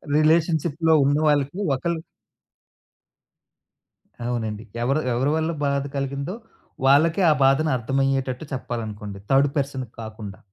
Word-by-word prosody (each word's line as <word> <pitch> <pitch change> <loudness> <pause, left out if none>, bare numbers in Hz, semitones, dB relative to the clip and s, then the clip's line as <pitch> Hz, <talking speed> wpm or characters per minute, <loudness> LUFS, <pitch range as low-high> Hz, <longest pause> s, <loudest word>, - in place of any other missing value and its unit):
రిలేషన్‌షిప్‌లో 160 0 +2
ఉన్నవాళ్ళకి 145 +1 +2 0.2
ఒకళ్ళు 165 +4 -2 2.3
అవునండి. 110 -3 -3 0.2
ఎవరు 135 +5 +1
ఎవరి 130 +5 +1
వల్ల 160 +1 0
బాధ 140 -1 0
కలిగిందో, 140 +6 -3 0.5
వాళ్ళకే 160 +7 +4
ఆ - - +6
బాధను 135 +3 +3
అర్థమయ్యేటట్టు 135 +2 -1
చెప్పాలనుకోండి. 110 -5 -5
థర్డ్ 135 +1 +5
పర్సన్‌కి 135 -4 -3
కాకుండా. 110 -3 -8
135 Hz, 95 wpm, -23 LUFS, 125-155 Hz, 2.3 s, ఆ